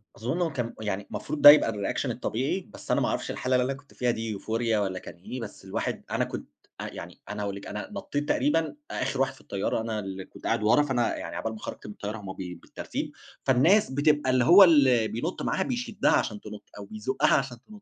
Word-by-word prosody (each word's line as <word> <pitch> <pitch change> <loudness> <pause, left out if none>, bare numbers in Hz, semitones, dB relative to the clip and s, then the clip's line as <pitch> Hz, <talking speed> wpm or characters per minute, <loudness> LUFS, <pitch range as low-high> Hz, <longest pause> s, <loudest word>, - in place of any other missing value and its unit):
أظُنّ 120 +10 -2
هو 170 -2 +1
كان 120 -2 -3
يعني 100 -2 -3
مفروض 150 0 -4
ده 145 - +12
يبقى 145 -6 +7
الReaction 100 -2 -2
الطبيعي، - - -2
بس - - -7
أنا - - +3
ما - - +2
أعرفش - - -2
الحالة 130 0 0
اللي 125 0 +3
أنا 135 - -1
كنت 140 +1 -15
فيها 125 -1 +1
دي 110 -2 -3
Euphoria 115 +1 0
والّا 95 -3 -1
كان - - -10
إيه، 120 +8 -7
بس 105 -3 -9
الواحد 95 - -3
أنا - - +1
كنت - - -7 0.3
يعني - - -8
أنا 105 0 -4
أقول 100 -1 -3
لِك 100 - -9
أنا 105 +1 -5
نطّيت 150 -8 -3
تقريبًا 160 +2 +1 0.2
آخر 135 - -1
واحد 135 0 +1
في 135 - -18
الطّيّارة، 100 +2 -2
أنا 110 -1 -3
اللي 95 -2 -6
كنت - - -16
قاعد - - +1
ورا، 110 +7 +5
فأنا 130 -4 0
يعني - - -6
عقبال 115 - -3
ما 110 - -9
خرجت - - -7
من 105 - -7
الطّيّارة 105 +2 -5
هُم 100 -3 -7
بي 90 -2 -6
بالترتيب، 85 - -6 0.3
فالناس 155 +10 +4
بتبقى 145 0 +2
اللي 130 -1 +4
هو 185 +8 +10
ال 135 -10 +5
بينُطّ 155 +11 -3
معاها، 190 - 0
بيشدّها 240 -4 0
عشان 105 -2 +1
تنُطّ، 105 -1 -9
أو 100 - -7
بيزوقّها 110 +6 0
عشان 130 -3 -3
تنُطّ. 210 -1 -13
120 Hz, 225 wpm, -27 LUFS, 105-145 Hz, 0.3 s, ده